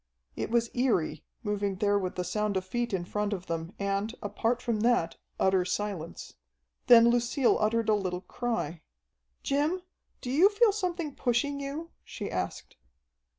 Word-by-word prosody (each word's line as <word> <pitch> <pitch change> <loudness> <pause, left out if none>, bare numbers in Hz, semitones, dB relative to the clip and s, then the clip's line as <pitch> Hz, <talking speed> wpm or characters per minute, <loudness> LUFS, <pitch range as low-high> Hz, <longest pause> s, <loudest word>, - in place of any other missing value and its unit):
It - - -3
was 235 0 +2
eery, 180 - +1 0.2
moving 205 -2 -1
there 205 +1 +2
with 185 -2 -3
the 180 - -1
sound 205 +2 -1
of 185 - -2
feet 240 +4 -2
in 185 -3 -1
front 210 +2 -1
of 185 -2 -5
them, 165 +1 -4
and, 200 +3 -1
apart 225 +4 0
from 235 -3 -1
that, 215 -8 +2 0.2
utter 190 -1 +3
silence. 180 -3 -4 0.5
Then 235 -1 +8
Lucille 240 +2 +2
uttered 225 +1 +1
a 215 - +4
little 185 -3 -1
cry. 195 -10 -3 0.6
"Jim, 305 +6 0 0.4
do 250 - -5
you 335 +9 +6
feel 430 +1 +4
something 355 -7 -2
pushing 270 +3 0
you?" 290 +4 -5
she 205 - -6
asked. 90 -1 -4
215 Hz, 155 wpm, -29 LUFS, 190-245 Hz, 0.6 s, Then